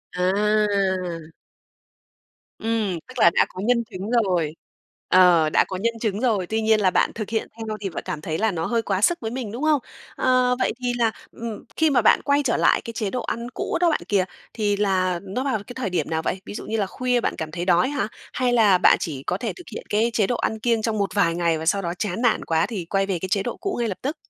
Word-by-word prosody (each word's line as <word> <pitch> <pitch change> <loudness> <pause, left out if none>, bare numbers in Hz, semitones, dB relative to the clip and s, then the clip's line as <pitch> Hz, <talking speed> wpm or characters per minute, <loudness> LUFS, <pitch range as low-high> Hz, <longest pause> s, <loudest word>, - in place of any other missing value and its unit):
À! 190 -3 +1 1.3
Ừm, 215 -6 -1
tức 255 -1 -8
là 170 - +7
đã - - +4
có 185 - -7
nhân 240 -1 +2
chứng 200 -1 -7 0.2
rồi, 165 -5 0 0.5
ờ, 175 -4 +6
đã - - +4
có 185 - -4
nhân 230 +4 0
chứng 210 -2 -1
rồi, 210 -8 +1
tuy 220 +3 -1
nhiên 220 0 +3
là 185 -2 +3
bạn - - +2
thực 215 -2 -5
hiện 225 -1 -1
theo 220 -1 -4
thì 195 - -2
vợ - - -5
cảm 150 - -4
thấy 160 0 -3
là 220 0 +1
nó 165 -2 -2
hơi 230 -1 +1
quá 195 -2 -1
sức 345 +9 +3
với 225 0 -3
mình, 245 -5 -4
đúng 250 +6 -5
không? 305 -2 +3 0.4
Ờ, 255 -1 +3
vậy - - +1
thì 245 -1 0
là, 230 -2 +2 0.2
ừm, 230 -2 -7
khi 320 -1 +4
mà 270 - +3
bạn - - +5
quay 285 0 +2
trở 235 - +1
lại - - +3
cái 230 - -7
chế 215 -4 -2
độ 250 +2 -3
ăn 235 +1 -4
cũ - - -2
đó 345 - +5
bạn 310 - 0
kìa, 195 -3 +2 0.3
thì 210 -2 0
là 185 -3 +1
nó 200 +7 -3
vào 270 -4 0
cái 245 - -8
thời 245 -7 -2
điểm 165 -4 -1
nào 160 0 -1
vậy? 185 +3 -3
Ví - - -7
dụ 210 - -6
như 225 - -2
là 200 - +1
khuya 250 +4 0
bạn - - -1
cảm 155 -1 -5
thấy 175 +1 -4
đói 180 +6 +3
hả? 285 -6 -1 0.3
Hay 250 -1 +1
là 210 -6 +5
bạn - - +5
chỉ 140 -4 -4
có 180 - -1
thể 225 +1 -3
thực 355 - -13
hiện 475 - -6
cái 220 +3 +2
chế 205 -4 +2
độ 245 - 0
ăn 220 -1 -2
kiêng 230 -1 +1
trong 220 -1 -1
một 200 -1 0
vài 170 -5 +2
ngày, 170 -2 +1
và 160 - -5
sau 200 +4 +2
đó 170 -1 -3
chán 210 +2 -2
nản 235 -3 +2
quá 160 -1 +2
thì 195 -8 -5
quay 195 +2 0
về 190 -4 -2
cái 190 - -5
chế 195 0 +1
độ 240 - -4
cũ 390 +1 -3
ngay 235 - 0
lập 190 - -4
tức? 290 +5 -2
210 Hz, 260 wpm, -23 LUFS, 185-235 Hz, 1.3 s, là